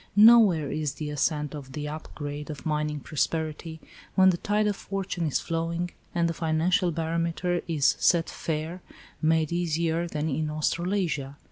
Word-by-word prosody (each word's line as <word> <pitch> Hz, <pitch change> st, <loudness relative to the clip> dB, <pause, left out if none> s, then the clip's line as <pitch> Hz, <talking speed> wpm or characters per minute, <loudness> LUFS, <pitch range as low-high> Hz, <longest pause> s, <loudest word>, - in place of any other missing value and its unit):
Nowhere 205 Hz, -9 st, +7 dB
is 150 Hz, -2 st, -2 dB
the 150 Hz, -1 st, -5 dB
ascent 150 Hz, 0 st, 0 dB
of 135 Hz, -3 st, -8 dB
the 150 Hz, -1 st, -4 dB
"up 155 Hz, +1 st, -7 dB
grade" 145 Hz, 0 st, -5 dB
of 145 Hz, -4 st, -7 dB
mining 150 Hz, -1 st, -1 dB
prosperity, 160 Hz, +2 st, -2 dB, 0.4 s
when 190 Hz, 0 st, +6 dB
the 175 Hz, -, -2 dB
tide 210 Hz, +4 st, +1 dB
of 205 Hz, -1 st, +1 dB
fortune 195 Hz, -4 st, -3 dB
is 145 Hz, -, +1 dB
flowing, 165 Hz, +1 st, -2 dB, 0.2 s
and 170 Hz, -1 st, +2 dB
the 165 Hz, -, -1 dB
financial 170 Hz, +4 st, +1 dB
barometer 170 Hz, +2 st, -1 dB
is 150 Hz, -4 st, +3 dB
"set 170 Hz, -2 st, +3 dB
fair," 160 Hz, +3 st, -4 dB, 0.4 s
made 160 Hz, -1 st, +2 dB
easier 170 Hz, 0 st, 0 dB
than 155 Hz, -1 st, -2 dB
in 155 Hz, +1 st, -1 dB
Australasia. 155 Hz, -2 st, -1 dB
160 Hz, 155 wpm, -27 LUFS, 150-175 Hz, 0.4 s, Nowhere